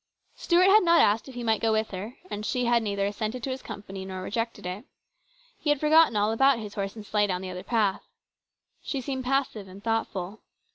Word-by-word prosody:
Stuart 350 +1 +3
had 430 +2 +7
not 340 -1 +5
asked 215 +5 +3
if 260 - -11
he 245 - -5
might 220 -2 +1
go 225 - +2
with 220 0 0
her, 205 +8 -6
and 205 - -4
she 250 +3 -1
had 235 0 +3
neither 200 -2 -1
assented 215 +4 -3
to 270 - -2
his 260 0 -5
company 195 -1 -8
nor 190 -1 -6
rejected 230 +3 -3
it. 180 +5 -5 0.8
He 300 - -2
had 295 -2 +3
forgotten 310 -4 +5
all 210 +1 +2
about 270 +3 +4
his 210 -3 -7
horse 195 0 -4
and 215 -2 -9
sleigh 210 0 +1
down 185 -1 -2
the 185 - -5
other 180 0 -6
path. 205 -1 0 0.8
She 275 - -3
seemed 260 0 -4
passive 255 -6 -1
and 190 +2 -12
thoughtful. 220 -3 -2
220 Hz, 220 wpm, -27 LUFS, 200-255 Hz, 0.8 s, had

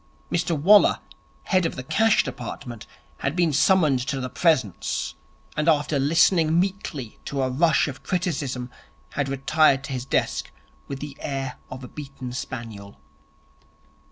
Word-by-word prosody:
Mr 170 -2 0
Waller, 205 +7 +6 0.4
head 185 -2 +2
of - - -6
the 130 - -6
Cash 220 +10 +3
Department, 120 -3 -7 0.3
had 140 - -1
been 170 -4 +2
summoned 155 -3 +4
to 135 +2 -2
the 130 0 -4
Presence, 145 - 0 0.4
and 150 +2 +2
after 145 -2 +2
listening 165 +3 +4
meekly 180 - -3
to 140 -2 -2
a 130 - 0
rush 150 +2 +3
of 135 -2 -7
criticism, 140 -9 -2 0.4
had 140 -2 -2
retired 135 0 +3
to 140 - -5
his 125 -1 -4
desk - - -1 0.4
with 140 -1 -6
the 145 -2 -6
air 135 -2 -4
of 130 0 -8
a - - -7
beaten 135 -4 -8
spaniel. 115 -6 -7
140 Hz, 145 wpm, -24 LUFS, 130-165 Hz, 0.4 s, Waller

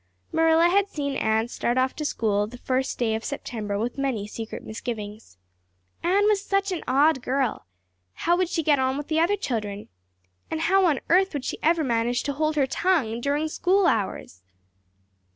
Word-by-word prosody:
Marilla 325 +1 +4
had 395 +3 +3
seen 280 -4 -3
Anne 220 +1 +1
start 240 0 -2
off 260 0 +1
to 305 - -3
school 215 -7 0
on 210 - -2
the 245 - -10
first 260 +1 -1
day 230 -3 0
of 220 +1 -3
September 220 -7 -4
with 235 +5 -3
many 255 -7 -1
secret 220 +1 -7
misgivings. 215 - -7 0.6
Anne 390 +4 +2
was 415 -2 +2
such 395 -1 0
an 355 - -3
odd 275 +2 +3
girl. 260 - -1 0.5
How 345 +1 +1
would 365 -1 0
she 330 -3 -1
get 290 -2 +3
on 260 +1 +1
with 290 +1 -6
the 315 0 +1
other 360 +5 +2
children? 210 - -4 0.6
And 320 - -3
how 380 +2 +4
on 295 -5 +1
earth 380 +2 +4
would 285 -3 -4
she - - -4
ever 325 0 +2
manage 240 -1 0
to 285 - -2
hold 310 +2 0
her 285 -2 +3
tongue 265 -7 0
during 290 +4 0
school 370 +5 +2
hours? 195 - -1
275 Hz, 190 wpm, -25 LUFS, 230-330 Hz, 0.6 s, Marilla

